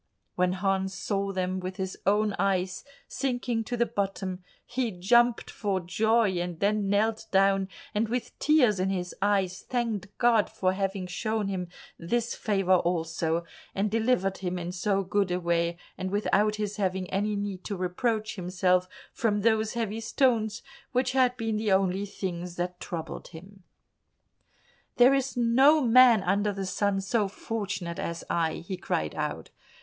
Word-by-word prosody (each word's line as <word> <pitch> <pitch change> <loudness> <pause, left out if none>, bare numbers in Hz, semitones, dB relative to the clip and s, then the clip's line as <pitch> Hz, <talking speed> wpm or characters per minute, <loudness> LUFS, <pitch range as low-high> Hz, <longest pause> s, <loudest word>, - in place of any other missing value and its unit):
When 180 0 +1
Hans 190 0 -1
saw 200 +1 -2
them 185 0 -2
with 185 0 -5
his 190 -1 -4
own 210 +1 +3
eyes 190 -1 0 0.2
sinking 245 -3 -1
to 245 - -3
the 235 - +3
bottom, 195 -4 -3 0.2
he 245 -1 -1
jumped 235 +6 +2
for 200 -3 -1
joy, 210 +2 +2
and 175 -1 -4
then 205 0 +1
knelt 220 +2 +1
down, 195 0 +3 0.2
and 215 +1 0
with 245 0 -4
tears 255 -10 +4
in 185 +1 +1
his 180 -2 -3
eyes 195 -2 +1
thanked 230 -5 -2
God 235 -3 +3
for 185 -1 0
having 195 -1 -2
shown 210 +3 -2
him 185 -2 -3 0.3
this 235 +7 -1
favour 195 -4 +2
also, 165 -1 -1 0.3
and 200 +1 0
delivered 220 -4 +1
him 180 -1 -3
in 175 0 -4
so 195 +2 0
good 195 +1 0
a 180 0 0
way, 170 -1 0 0.2
and 185 - -2
without 210 +1 +2
his 210 -1 -3
having 190 -2 -1
any 205 +2 0
need 200 -2 -4
to 205 - -3
reproach 215 +4 -1
himself, 180 0 +1 0.2
from 210 -3 0
those 220 0 +2
heavy 225 -2 -2
stones 225 -2 +1 0.3
which 255 0 +1
had 255 -1 +2
been 225 -1 -1
the 215 -1 0
only 190 +1 +2
things 180 -3 -5
that 180 0 -3
troubled 170 -4 -6
him. 190 +4 -13 1.4
"There 250 +2 +7
is 270 -2 -1
no 260 +6 +5
man 240 -3 +6
under 200 +3 +1
the 195 -1 -4
sun 195 +1 0
so 205 +1 +1
fortunate 195 -4 -4
as 170 0 -4
I," 165 -2 +1
he 185 0 -4
cried 80 - -2
out. - - -4
195 Hz, 160 wpm, -28 LUFS, 185-220 Hz, 1.4 s, There